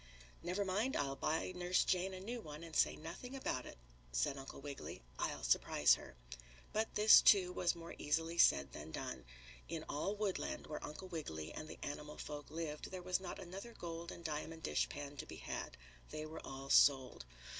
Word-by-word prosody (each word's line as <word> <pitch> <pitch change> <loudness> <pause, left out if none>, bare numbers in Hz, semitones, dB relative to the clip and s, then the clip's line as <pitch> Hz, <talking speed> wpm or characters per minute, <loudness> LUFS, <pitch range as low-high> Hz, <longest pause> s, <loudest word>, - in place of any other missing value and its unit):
"Never 185 +4 -1
mind, 210 +8 +1
I'll 135 -1 0
buy 160 +6 0
Nurse 180 0 +2
Jane 185 +1 +1
a - - -6
new 230 +5 -4
one 150 -1 -8
and 165 -2 -8
say - - +4
nothing 180 - -7
about 130 - -2
it," - - -10 0.3
said - - +1
Uncle 135 0 -8
Wiggily. 140 - -7 0.2
"I'll - - -1
surprise - - +5
her." - - -4 0.6
But 220 +1 0
this, 215 +1 +9
too, 185 -3 +6
was 175 -1 +2
more 170 0 -8
easily 165 +3 0
said 70 0 +6
than 75 +1 -7
done. 80 - -5 0.4
In 165 -1 -3
all 175 +8 -1
Woodland, 205 -2 -2
where 150 - -5
Uncle 185 +5 -7
Wiggily 80 - -4
and 155 - -6
the - - -8
animal 150 +1 -5
folk 150 -1 -6
lived, 155 -2 -4
there 185 -1 -6
was 180 0 +1
not 185 -2 -5
another 195 +5 -8
gold 170 0 -5
and 170 - -10
diamond 160 +1 -3
dishpan 145 0 -1
to - - -5
be - - -7
had. - - -5 0.3
They 155 0 -4
were 155 +1 -7
all 135 0 -6
sold. 130 - +5
165 Hz, 190 wpm, -38 LUFS, 145-185 Hz, 0.6 s, this